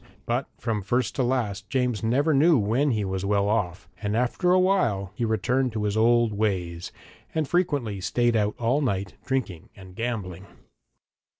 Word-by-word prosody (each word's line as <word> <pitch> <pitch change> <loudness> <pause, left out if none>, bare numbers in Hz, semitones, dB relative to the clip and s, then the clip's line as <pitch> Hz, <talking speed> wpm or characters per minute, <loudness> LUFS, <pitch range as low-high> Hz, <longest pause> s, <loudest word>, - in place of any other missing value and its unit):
But - - -1
from 110 -3 -2
first 120 +5 0
to - - +2
last 110 -6 -1
James 125 -4 0
never 140 +8 +2
knew 155 +3 +5
when 120 +7 +1
he 110 -5 0
was 95 0 -3
well 100 0 +1
off, 90 -5 -1
and 105 0 -1
after 125 +9 +1
a 185 - +5
while 120 - +1
he 120 - -2
returned 120 +4 0
to 110 -1 -2
his 105 0 -1
old 115 0 +3
ways, 90 -5 -2 0.4
and 155 -3 0
frequently 145 - 0
stayed 120 +6 +1
out 105 -1 +1
all 120 +5 +1
night, 100 -7 -1
drinking 125 -11 -2
and 95 -2 -13
gambling. 100 -6 -4
110 Hz, 170 wpm, -25 LUFS, 100-130 Hz, 0.4 s, knew